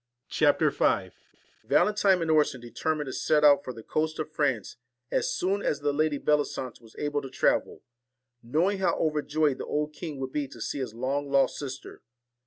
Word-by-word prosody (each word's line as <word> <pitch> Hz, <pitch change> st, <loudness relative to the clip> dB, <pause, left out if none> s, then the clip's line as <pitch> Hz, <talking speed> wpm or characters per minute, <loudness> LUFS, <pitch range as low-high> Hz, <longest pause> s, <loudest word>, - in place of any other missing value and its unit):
CHAPTER -, -, +3 dB
V -, -, +1 dB, 0.5 s
VALENTINE 190 Hz, -, +3 dB
and 160 Hz, -, 0 dB
Orson 150 Hz, -4 st, +3 dB
determined 145 Hz, +6 st, -2 dB
to 130 Hz, -, -6 dB
set 150 Hz, -1 st, +2 dB
out 145 Hz, -1 st, +6 dB
for 130 Hz, -, -5 dB
the 115 Hz, -2 st, -11 dB
coast 155 Hz, +4 st, -1 dB
of 155 Hz, 0 st, -4 dB
France 135 Hz, -11 st, -1 dB, 0.3 s
as -, -, +1 dB
soon 195 Hz, +3 st, 0 dB
as 150 Hz, -6 st, -1 dB
the 145 Hz, 0 st, 0 dB
Lady 155 Hz, 0 st, +1 dB
Belli 150 Hz, 0 st, +2 dB
sance 125 Hz, -2 st, -7 dB
was 115 Hz, -1 st, -18 dB
able 145 Hz, -1 st, -1 dB
to 135 Hz, -, -8 dB
travel, 130 Hz, -, 0 dB, 0.6 s
knowing 170 Hz, -, 0 dB
how 190 Hz, -, +2 dB
overjoyed 150 Hz, -2 st, 0 dB
the -, -, -4 dB
old 150 Hz, 0 st, -1 dB
king 150 Hz, -2 st, -6 dB
would 130 Hz, -1 st, -4 dB
be 145 Hz, 0 st, -2 dB
to 120 Hz, -, -13 dB
see 140 Hz, -, -3 dB
his 120 Hz, -4 st, -4 dB
long 140 Hz, +4 st, -2 dB
lost 140 Hz, 0 st, +2 dB
sister. 135 Hz, -1 st, -7 dB
145 Hz, 190 wpm, -27 LUFS, 130-155 Hz, 0.6 s, out